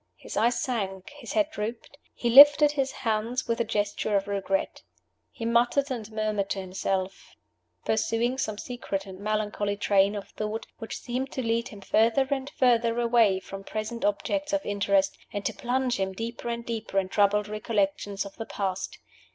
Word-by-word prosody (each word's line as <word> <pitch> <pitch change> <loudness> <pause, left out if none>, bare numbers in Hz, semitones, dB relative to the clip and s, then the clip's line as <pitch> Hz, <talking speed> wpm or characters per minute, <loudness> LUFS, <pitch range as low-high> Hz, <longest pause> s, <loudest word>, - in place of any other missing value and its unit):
His - - -9
eyes 235 +3 +2
sank, 195 -4 -3
his 290 0 -8
head 315 -1 +2
drooped; 225 +1 -5 0.2
he 235 - 0
lifted 290 +3 +9
his 270 -2 -1
hands 225 +2 -2
with 230 0 0
a - - +3
gesture 210 -1 -1
of 195 0 +1
regret. 195 -1 -1 0.5
He 230 - -6
muttered 240 +4 +2
and 220 -4 -5
murmured 215 -2 -1
to 195 - -1
himself; 190 0 -3 0.5
pursuing 230 +3 0
some 215 -5 -2
secret 215 -5 -4
and 190 -1 -10
melancholy 210 -1 -1
train 200 0 +3
of 200 - -6
thought, 215 +1 -4
which 225 - -5
seemed 255 +2 -4
to 260 - -2
lead 230 0 0
him 205 -2 -11
further 230 +7 +3
and 270 0 -1
further 235 -2 +2
away 230 -5 +4
from 195 +1 -9
present 215 +3 -5
objects 295 +9 -1
of 295 0 0
interest, 200 -1 +1
and 205 -1 -4
to - - 0
plunge 250 0 -1
him 190 0 -1
deeper 230 +3 -5
and 235 0 -4
deeper 225 -4 -4
in 190 -1 +2
troubled 205 +1 +2
recollections 205 -2 -1
of 200 - -10
the 225 - -5
past. 195 -2 -3
220 Hz, 175 wpm, -27 LUFS, 200-240 Hz, 0.5 s, lifted